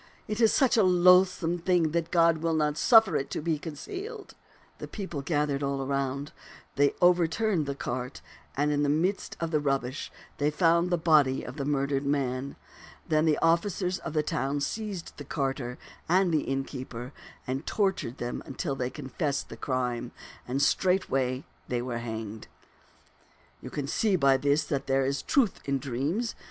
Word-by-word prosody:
It 215 +2 -2
is 225 - +6
such 260 -4 +3
a 220 - +5
loathsome 180 -1 +4
thing 170 -2 +2
that 170 0 -1
God 165 -2 +4
will 165 0 0
not 150 -1 +1
suf 225 +6 +6
fer 185 -7 -1
it 135 - -3
to - - -3
be 155 -1 -1
concealed. 395 - -7 0.5
The - - -6
people 190 -8 -5
gathered 145 -1 0
all 140 -1 -1
around. 140 +1 -2 0.4
They 140 0 +3
overturned 175 0 +3
the 140 - -2
cart, 125 -1 -4 0.4
and 145 +1 +2
in 145 0 +1
the 145 - +2
midst 175 +7 0
of 165 -1 -2
the 155 - +2
rubbish 135 -1 -2 0.3
they 145 +1 +2
found 170 +2 +3
the 175 - +2
body 150 -5 +3
of 125 +4 -8
the 140 - -2
murdered 140 -1 0
man. 140 -1 -1 0.5
Then 155 -2 +2
the 155 -2 +3
officers 180 +2 +1
of 165 - -6
the 155 -1 +1
town 145 -3 -1
seized 205 +1 -4
the 145 - -7
carter 135 -3 -3 0.3
and 185 +1 +3
the 155 - +1
innkeeper 130 -2 -5 0.3
and 130 +4 -4
tortured 190 - 0
them 120 0 -4 0.2
till 145 -7 -1
they 125 -2 -2
confessed 140 +1 -3
the - - -8
crime, 125 -2 -2 0.3
and 135 +3 0
straightway 135 -10 +1 0.2
they 120 -1 -1
were 120 -2 -3
hanged. 110 -2 -6 0.6
" - - -33
You - - -7
can 145 - -4
see 195 +7 +1
by 135 -5 +4
this 145 +3 +2
that 140 -2 -3
there 135 0 +2
is 135 0 -1
truth 250 -9 +1
in 140 0 0
dreams. 140 - -2
150 Hz, 175 wpm, -28 LUFS, 135-175 Hz, 0.6 s, is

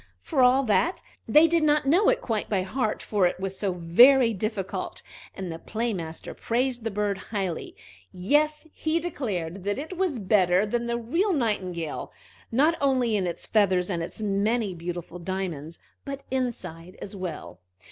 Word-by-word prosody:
For 285 -6 +1
all 255 +2 +5
that, 270 - +2 0.3
they 310 +2 +7
did 335 0 +2
not 300 -1 +3
know 350 +9 +4
it - - +2
quite 220 -3 -2
by 195 -3 +1
heart, 215 +2 -2
for 200 -4 +2
it 175 - -4
was 195 0 -3
so 195 -3 0
very 230 +9 +6
difficult. 205 -1 -4 0.3
And 190 -3 -5
the 165 - -6
Play 225 +4 -2
master 165 -3 -6
praised 245 0 -1
the 225 - -1
bird 205 -1 -1
highly; 195 -6 -4 0.4
yes, 300 - +1
he 315 +1 0
declared 200 - -4
that 205 +1 -1
it 310 +6 -5
was 365 -8 0
better 190 -2 +3
than 235 +2 -2
the 235 0 0
real 335 - 0
Nightingale, 185 - -2 0.4
not 295 +8 +3
only 255 -5 +2
in 190 -3 0
its 170 - -4
feathers 190 -3 +2
and 170 -2 -1
its 170 +6 -6
many 205 +1 0
beautiful 175 0 -6
diamonds, 170 -4 -4 0.3
but 275 -1 -6
inside 185 -10 -4
as 200 - -8
well. 180 - -6
210 Hz, 165 wpm, -26 LUFS, 185-265 Hz, 0.4 s, they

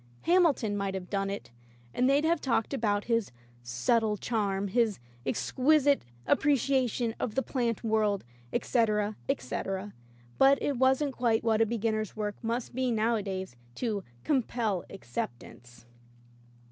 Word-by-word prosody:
Ham 360 +1 +5
ilton 225 -9 -1
might 200 -1 -2
have 180 -1 -6
done 195 -1 0
it, 200 -11 -6 0.4
and 255 +1 +2
they'd 285 +3 +3
have 330 -1 +2
talked 235 -1 0
about 210 -5 +1
his 230 -3 0 0.3
"subtle 210 - +1
charm," 200 -3 -1
his 225 -1 +2 0.3
"ex - - -1
quisite 285 +1 +4 0.2
appreciation 260 -4 +2
of 215 - -2
the 270 - +1
plant 240 -4 -1
world," 215 -3 +1 0.3
etc, 215 -3 +1
etc, 190 +11 -2 0.5
but 275 +1 +6
it 280 -3 -1
wasn't 265 +2 +3
quite 230 -3 +1
what 225 -1 +2
a 225 - +4
beginner's 215 -2 -1
work 210 -1 -2
must 230 +2 -2
be 255 +1 0
nowadays 210 - -1 0.2
to 215 -5 -2 0.2
"compel 235 - 0
ac 195 - -10
ceptance." 120 0 -7
225 Hz, 140 wpm, -29 LUFS, 200-255 Hz, 0.5 s, but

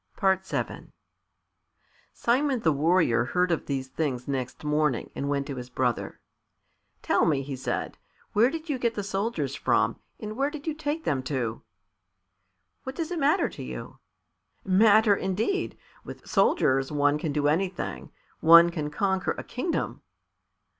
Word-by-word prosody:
VII 190 -1 -1 1.2
Simon 260 +2 +1
the 160 - +3
Warrior 150 -5 +2
heard 180 +6 +1
of 165 - -1
these 135 -2 -2
things 130 -3 -3
next 130 -1 -4
morning, 150 -4 0
and 140 - -3
went 140 -1 0
to 140 -2 -6
his 125 0 -7
brother. 125 -2 -2 0.8
"Tell - - +2
me," 140 -4 +1
he 135 0 -5
said, 130 - -4 0.3
"where 225 +4 +5
did 325 +2 -6
you 285 -4 -2
get 235 -2 0
the 205 - -3
soldiers 195 - -2
from, 115 -4 +1 0.2
and 215 0 -6
where 275 +3 +1
did 295 -1 -9
you 320 - -1
take 315 +1 -3
them 135 -3 0
to?" 120 -5 -2 1.2
"What 260 +1 -7
does 330 0 -3
it 350 - -2
matter 300 +6 +3
to - - -10
you?" - - -7 0.7
"Matter, 210 +2 +5
indeed! 205 - -1 0.3
With - - -10
soldiers 135 - +2
one 145 0 +2
can 155 -1 -2
do 145 0 +1
anything. 180 +4 -2 0.3
One 170 +1 +8
can 155 -3 -3
conquer 190 +4 0
a - - -5
kingdom." 265 +8 -3
170 Hz, 150 wpm, -27 LUFS, 140-225 Hz, 1.2 s, One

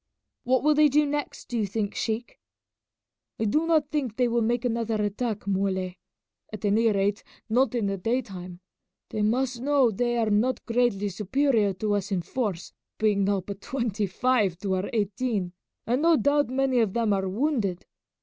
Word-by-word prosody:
"What 255 +1 +2
will 300 +1 +5
they 300 0 +5
do 300 +2 +3
next, 290 0 -4
do 240 - -1
you 210 - 0
think, 205 +1 -2
sheik?" 225 +2 -3 1.0
"I 225 - 0
do 305 +10 +1
not 310 -3 +2
think 265 -8 -2
they 250 -1 +3
will 235 0 +1
make 240 +2 0
another 230 -2 0
attack, 210 +1 -2
Muley; 190 -2 -1 0.5
at 215 -1 -6
any 220 +2 +3
rate 200 +1 0 0.2
not 245 +2 +2
in 230 -4 0
the 195 0 -1
daytime. 190 -6 -3 0.5
They 215 - -2
must 240 +3 0
know 275 -3 +3
they 240 +3 0
are 225 -2 +1
not 235 +5 +1
greatly 230 -4 +1
superior 215 +2 +1
to 205 +3 -1
us 205 0 -2
in 180 -3 0
force, 200 -4 -3 0.2
being 205 -2 +2
now 200 -1 +1
but 200 +2 -8
twenty 225 -5 -2
five 210 -3 +1
to 195 -2 -1
our 185 +1 -1
eighteen, 205 -3 -1 0.3
and 245 +5 +1
no 330 0 +5
doubt 285 -2 +2
many 260 -1 +1
of 215 -5 +1
them 230 -3 +1
are 190 -1 -1
wounded. 215 - -1
225 Hz, 180 wpm, -26 LUFS, 200-255 Hz, 1.0 s, will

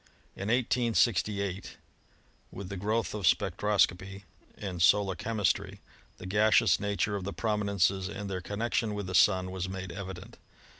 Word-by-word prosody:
In 100 - -5
1868, 115 -3 +1
no 100 0 -1
ASTRONOMY - - -11 0.7
with 95 -1 -8
the 100 - -5
growth 110 +4 -1
of 105 -4 -1
spectroscopy 95 +1 +1 0.3
and 90 -4 -5
solar 100 +2 +4
chemistry, 105 +1 -1 0.4
the - - -10
gaseous 110 +3 +3
nature 100 0 -1
of 100 - -4
the 100 - -4
prominences 100 -3 0
and 105 0 -6
their 95 -2 -4
connectioa 105 +2 -2
with 100 -1 -4
the 90 - -6
Sun 95 0 +3
was 95 0 -4
made 95 0 -6
evident. 95 -2 -8
100 Hz, 150 wpm, -29 LUFS, 95-105 Hz, 0.7 s, solar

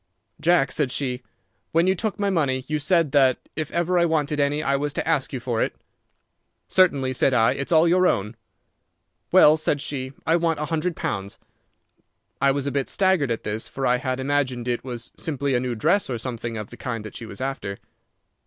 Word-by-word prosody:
"'Jack,' 160 -6 +3
said 140 -5 0
she, 125 -2 -2 0.5
'when 165 +2 +4
you 190 - +3
took 205 +2 -3
my 200 -1 +1
money 135 -7 0
you 150 0 -1
said 165 -1 +2
that 135 -3 +4 0.2
if 155 -1 -3
ever 175 +1 +1
I 170 - +4
wanted 150 -2 0
any 145 +1 +1
I 140 - +1
was 145 +1 -1
to - - -3
ask 150 -5 +1
you 130 - -3
for 120 -2 -2
it.' - - -1 0.9
"'Certainly,' 140 -8 +3
said 130 +1 +2
I. 115 -1 +4
'It's 140 +3 -4
all 165 0 +5
your 180 +2 +4
own.' 105 +4 -1 1.0
"'Well,' 150 +1 +7
said 150 -1 0
she, 135 -2 -4
'I 165 +2 +3
want 165 -2 0
a 150 - -1
hundred 165 +2 -1
pounds.' 100 0 -4 1.0
"I 140 - +4
was 140 0 0
a 140 - -1
bit 140 -1 -1
staggered 190 -8 +2
at 115 - -2
this, 110 +1 -3
for 135 - -4
I 125 0 +3
had 130 0 -3
imagined 130 -3 -1
it 120 -1 -1
was 120 -3 -6
simply 140 -3 -1
a 125 - +3
new 125 -1 -2
dress 195 - +1
or 125 - -2
something 115 -1 -5
of 105 -2 -7
the 120 - -10
kind 115 -2 -4
that 110 - -9
she 115 - -7
was 100 - -9
after. 130 -7 -4
140 Hz, 210 wpm, -24 LUFS, 125-160 Hz, 1.0 s, Well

